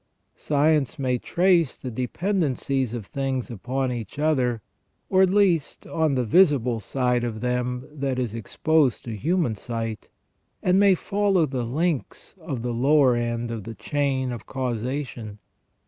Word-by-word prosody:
Science 150 -1 +1
may 130 -3 0
trace 175 -4 +2
the 130 - -6
dependencies 135 - -1
of 115 -4 -5
things 135 -1 -3
upon 130 +4 -2
each 120 0 -6
other, 130 -8 +1 0.5
at 190 0 +5
least, 185 -6 +2
on 160 -4 0
the 125 - +1
visible 125 - +4
side 125 +2 0
of 115 -2 -3
them 125 +1 -2
that 135 -3 -2
is 120 -4 -2
ex 115 -3 -8
posed 155 -6 +2
to 115 -2 -5
human 160 - 0
sight, 115 0 -5 0.5
and 185 +1 +4
may 200 -2 +6
follow 195 -2 +1
the 130 -4 -3
links 155 +4 -2
of 140 -8 -5
the 120 -1 -2
lower 135 +1 +4
end 120 0 -2
of 115 -3 -5
the 115 +2 -8
chain 130 +3 -1
of 120 - -7
causation. 125 -3 -4
130 Hz, 145 wpm, -24 LUFS, 120-155 Hz, 0.5 s, may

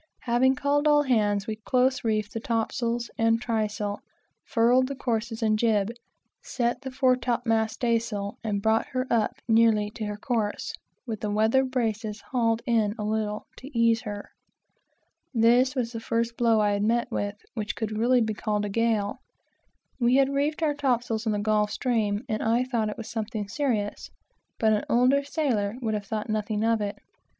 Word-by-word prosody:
Having 255 +2 +3
called 285 +2 +1
all 295 -1 +5
hands, 210 -6 +1
we 215 -1 -4
close 255 +3 +1
reefed 215 -2 -1
the 225 - -3
topsails 235 +1 -1
and 225 0 +3
trysail, 215 -3 -2 0.5
furled 245 +2 +3
the 275 - -5
courses 230 -3 -2
and 215 -1 +2
job, 215 -2 +2 0.5
set 240 0 -2
the 265 - -5
fore 260 -1 +3
top 245 -1 -2
mast 220 -1 +1
staysail, 225 -4 -1
and 205 -3 -2
brought 220 0 +2
her 255 0 0
up 225 -3 +1
nearly 220 -2 +4
to 215 0 -5
her 210 0 -4
course, 220 -2 -2 0.3
with 225 -4 -4
the 210 - -2
weather 220 +5 +3
braces 225 -4 -2
hauled 230 -2 +1
in 225 -4 +1
a 210 - -4
little, 210 0 -2
to 265 - -10
ease 230 -1 +3
her. 205 -3 -7 1.0
This 245 +4 +4
was 240 -3 -1
the 230 - -5
first 230 +1 -1
blow, 230 -2 +3
that 215 - +3
I 205 - +2 0.3
had - - -18
seen, 205 -2 -2 0.2
which 210 -3 -3
could 220 -1 -3
really 240 +3 +3
be 220 -1 0
called 210 0 -1
a - - -3
gale. 215 -1 0 0.8
We 245 +1 +3
had 275 0 +3
reefed 295 +3 0
our 300 -2 +2
topsails 240 -5 -1
in - - +2
the 210 - 0
Gulf 210 0 +1
Stream, 215 -2 -1
and 215 -1 -2
I 230 +2 +2
thought 235 -4 -1
it 220 +1 -6
something 215 -2 -4
serious, 215 -4 -2 0.5
but 220 -1 +3
an 210 - 0
older 255 +4 +4
sailor 245 -9 -1
would 225 -4 -2
have 205 -1 -3
thought 215 0 -3
nothing 215 0 -1
of 225 -1 +2
it. 205 0 -3
225 Hz, 180 wpm, -26 LUFS, 215-245 Hz, 1.0 s, all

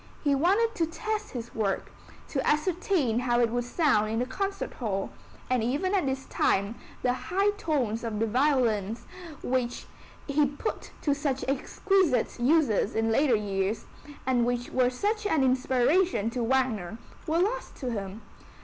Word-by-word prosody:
He 290 -2 +3
wanted 395 +11 +3
to 330 - +1
test 425 +5 -3
his 235 -2 -6
work, 200 -3 -1 0.4
to 270 -3 -1
ascertain 305 - +1
how 240 -1 +1
it 235 -2 +3
would 245 0 -1
sound 245 -6 +2
in 220 - -1
the 245 - +1
concert 390 +9 -3
hall, 200 -5 -3 0.4
and 250 -3 +1
even 290 - 0
at 370 -8 +2
this 265 0 -2
time 200 +3 +1 0.3
the 245 - +3
high 390 +10 +1
tones 275 - -1
of 225 -2 -3
the 225 - +2
violins, 235 -3 +1 0.4
which 245 -1 -1 0.4
he 290 0 +2
put 290 +11 -4
to 290 - +3
such 280 -2 -2
exquisite 295 +2 +1
uses 255 -6 +2
in 225 0 +1
later 265 +1 +4
years, 200 0 -1 0.4
and 250 -2 +2
which 245 0 -1
were 255 -1 +3
such 415 - -1
an 315 -8 +2
inspiration 260 - +2
to 245 - -2
Wagner, 225 -6 0 0.3
were 320 +1 +1
lost 430 +8 -1
to 255 -3 -4
him. 200 -1 -5
255 Hz, 160 wpm, -28 LUFS, 230-320 Hz, 0.4 s, later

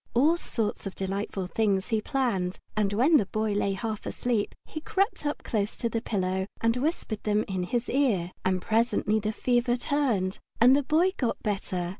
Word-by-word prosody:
All 295 +8 +5
sorts 225 - -3
of 195 - -7
delightful 195 0 -3
things 195 0 0
he 220 -2 +1
planned, 210 -9 -1 0.2
and 210 -2 +1
while 265 +10 +5
the 200 - +1
Boy 215 +1 -1
lay 200 -1 +1
half 215 +1 -4
asleep 235 -4 -1
he 310 - -7
crept 395 -3 0
up 290 - -3
close 210 -2 -1
to 235 - -2
the 230 0 -2
pillow 190 -3 -1
and 230 0 +2
whispered 250 -5 -2
them 210 0 +1
in 190 -2 -2
his 235 +6 -1
ear. 220 -11 +1
And 185 -1 0
presently 225 -1 +2
the 215 0 -1
fever 240 +2 +1
turned, 240 -8 0 0.2
and 250 +3 +7
the 285 - +3
Boy 320 +7 +3
got 245 -4 -1
better. 195 -4 -2
220 Hz, 185 wpm, -27 LUFS, 195-250 Hz, 0.2 s, and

